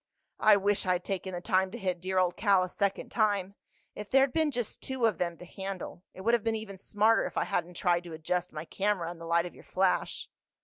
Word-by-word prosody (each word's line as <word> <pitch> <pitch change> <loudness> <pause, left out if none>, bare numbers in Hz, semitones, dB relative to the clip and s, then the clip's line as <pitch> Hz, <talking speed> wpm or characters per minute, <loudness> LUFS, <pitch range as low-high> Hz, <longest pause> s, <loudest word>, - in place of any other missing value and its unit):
"I 215 -1 +6
wish 200 -1 +1
I'd 180 -1 +1
taken 190 -1 -3
the 175 - -4
time 190 -1 +2
to 235 - -7
hit 185 -5 -2
dear 190 +1 -2
old 180 -1 +3
Cal 200 -4 +4
a 185 - -3
second 200 +1 -1
time. 205 -4 +1 0.4
If 210 -1 -8
there'd 270 -1 +4
been 315 -2 +2
just 245 -5 -4
two 265 -3 -1
of 220 - +1
them 170 -1 -1
to 180 - -11
handle—It 190 -1 -7
would 230 +4 +2
have 235 -3 +3
been 225 -1 +1
even 215 -3 -6
smarter 215 +4 +2
if - - -8
I - - +3
hadn't 175 +1 -2
tried 175 0 +1
to 170 - -8
adjust 180 +3 -2
my 155 +1 -6
camera 190 -3 -1
in 175 - -10
the 165 - -8
light 170 +1 +3
of 175 - -7
your - - -15
flash." 190 0 0
190 Hz, 235 wpm, -30 LUFS, 180-210 Hz, 0.4 s, I